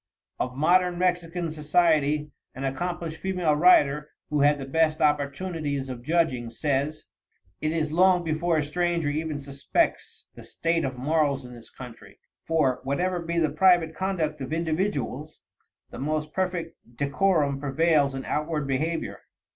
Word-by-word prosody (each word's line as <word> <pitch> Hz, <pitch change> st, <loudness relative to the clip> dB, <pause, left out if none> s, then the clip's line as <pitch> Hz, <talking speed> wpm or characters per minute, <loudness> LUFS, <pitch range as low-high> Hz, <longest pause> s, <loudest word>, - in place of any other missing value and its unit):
Of 125 Hz, 0 st, -2 dB
modern 175 Hz, +4 st, +3 dB
Mexican 175 Hz, -2 st, -1 dB
society, 150 Hz, -1 st, +2 dB, 0.2 s
an 135 Hz, -, -6 dB
accomplished 165 Hz, +4 st, -3 dB
female 180 Hz, -5 st, +1 dB
writer, 150 Hz, -3 st, +4 dB, 0.2 s
who 150 Hz, -, +1 dB
had 145 Hz, +1 st, +4 dB
the 135 Hz, -, -6 dB
best 155 Hz, +3 st, +1 dB
opportunities 145 Hz, -1 st, -1 dB
of 125 Hz, -2 st, -6 dB
judging, 135 Hz, -5 st, 0 dB
says: 145 Hz, +4 st, -2 dB, 0.6 s
"It 155 Hz, -, 0 dB
is 155 Hz, -2 st, -1 dB
long 180 Hz, +1 st, +4 dB
before 165 Hz, +1 st, 0 dB
a 155 Hz, -, +1 dB
stranger 170 Hz, 0 st, 0 dB
even 155 Hz, 0 st, -2 dB
suspects 140 Hz, -1 st, -2 dB
the -, -, -12 dB
state 165 Hz, -1 st, -1 dB
of 130 Hz, -1 st, -4 dB
morals 140 Hz, -1 st, 0 dB
in 125 Hz, -, -10 dB
this 120 Hz, -2 st, -13 dB
country, 115 Hz, -5 st, -12 dB, 0.3 s
for, 150 Hz, -6 st, +2 dB
whatever 175 Hz, +7 st, -1 dB
be 170 Hz, 0 st, -3 dB
the 160 Hz, -3 st, +2 dB
private 170 Hz, 0 st, +4 dB
conduct 160 Hz, -5 st, -2 dB
of 130 Hz, +2 st, -5 dB
individuals, 155 Hz, -, -2 dB, 0.5 s
the -, -, -8 dB
most 150 Hz, +2 st, -2 dB
perfect 180 Hz, -3 st, -2 dB, 0.2 s
decorum 145 Hz, 0 st, +1 dB
prevails 145 Hz, 0 st, +2 dB
in 135 Hz, -, -5 dB
outward 150 Hz, -1 st, -2 dB
behavior. 155 Hz, +5 st, -2 dB
155 Hz, 145 wpm, -26 LUFS, 140-170 Hz, 0.6 s, writer